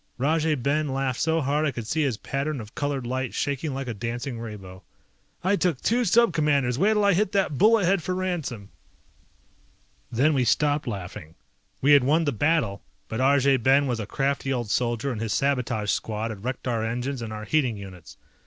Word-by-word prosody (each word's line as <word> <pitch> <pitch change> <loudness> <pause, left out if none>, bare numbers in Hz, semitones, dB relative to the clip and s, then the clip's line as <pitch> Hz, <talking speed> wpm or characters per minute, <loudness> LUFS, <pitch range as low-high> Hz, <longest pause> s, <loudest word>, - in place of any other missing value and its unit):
Rajay 155 +4 +1
Ben 145 +4 0
laughed 135 -2 -1
so 160 0 +1
hard 145 +2 0
I 155 - +2
could 120 -4 -6
see 155 +8 -1
his 135 -7 0
pattern 140 +3 -3
of 110 -1 -10
colored 145 -3 -2
light 130 0 -3
shaking 145 +2 -2
like 135 -1 -4
a 120 - -3
dancing 120 +3 -4
rainbow. 100 -5 -9 0.6
"I 190 +3 +3
took 180 -8 0
two 240 +2 +1
Sub 230 0 +4
Commanders, 140 -5 +1
wait'll 210 +2 +3
I 200 - +5
hit 200 +2 +1
that 190 -8 0
bullet 215 0 +5
head 190 +1 +2
for 185 +4 -2
ransom!" 160 - -3 1.4
Then 140 +7 +3
we 130 -3 +2
stopped 145 +4 +1
laughing. 90 -6 -6 0.5
We 140 - +4
had 145 -3 +7
won 155 +6 +3
the 145 - 0
battle, 135 -6 0 0.3
but 110 - -3
Arjay 135 0 +4
Ben 135 +4 +4
was 120 -4 -1
a 105 - -4
crafty 135 +2 -1
old 120 -5 -2
soldier 120 +3 0
and 115 -3 -4
his 115 -2 -1
sabotage 125 -7 0
squad 110 +1 -2
had 100 -2 -9
wrecked 130 +1 -4
our 115 -3 0
engines 120 +3 -3
and 115 -2 -5
our 110 0 -6
heating 130 -5 +1
units. 95 -4 -11
135 Hz, 195 wpm, -25 LUFS, 115-155 Hz, 1.4 s, had